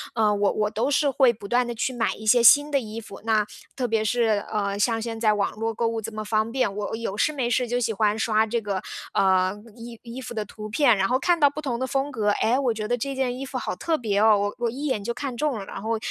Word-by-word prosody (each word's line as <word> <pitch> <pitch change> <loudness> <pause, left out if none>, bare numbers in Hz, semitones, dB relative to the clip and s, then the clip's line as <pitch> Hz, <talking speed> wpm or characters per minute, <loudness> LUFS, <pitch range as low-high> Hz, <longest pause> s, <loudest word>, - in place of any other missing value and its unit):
呃， 215 -2 +3
我 205 0 +2
我 210 -1 0
都 225 +5 -1
是 290 0 +2
会 265 -2 +4
不 205 -3 -10
断 245 +3 +1
地 240 - -4
去 255 +3 -1
买 235 -2 -1
一 215 - -11
些 240 +3 +5
新 290 +5 +7
的 280 - +3
衣 220 -2 -6
服， 210 -3 -11
那 220 -2 +2 0.3
特 255 -2 -1
别 225 -1 +1
是， 220 -2 +1
呃， 200 -2 -1
像 225 +2 +1
现 225 0 -5
在 215 -2 +3
网 205 -1 0
络 225 +1 -2
购 230 +1 0
物 225 0 -2
这 225 +1 -6
么 215 0 -6
方 220 +1 0
便， 255 -5 0
我 210 +1 -3
有 225 -3 -4
事 215 - +1
没 270 -5 -2
事 245 +1 +1
就 245 +1 0
喜 230 -2 0
欢 210 0 +1
刷 220 0 +2
这 235 +2 -1
个， 200 -3 -3 0.3
呃， 185 -1 +3 0.2
衣 235 -1 -10
衣 235 +1 -8
服 250 -2 -7
的 215 -2 -2
图 210 +1 -9
片， 235 +1 +3
然 195 0 +2
后 255 +4 +1
看 350 +3 +2
到 290 - +6
不 305 - -6
同 260 -5 -2
的 260 - -2
风 270 +2 -1
格， 215 -6 0
哎， 225 +4 +2
我 255 -4 +1
觉 215 -1 -4
得， 245 +2 0
这 275 +4 -3
件 260 -2 -1
衣 270 - -5
服 260 - -5
好 245 - -3
特 320 - -1
别 210 -7 -1
哦， 215 0 +5
我 205 0 -2
我 240 -1 0
一 270 +6 -5
眼 240 -8 -1
就 235 +3 -2
看 265 -1 -5
中 290 -1 -1
了， 200 - -6
然 195 - -8
后 225 +2 -1
225 Hz, 305 characters per minute, -24 LUFS, 215-250 Hz, 0.3 s, 新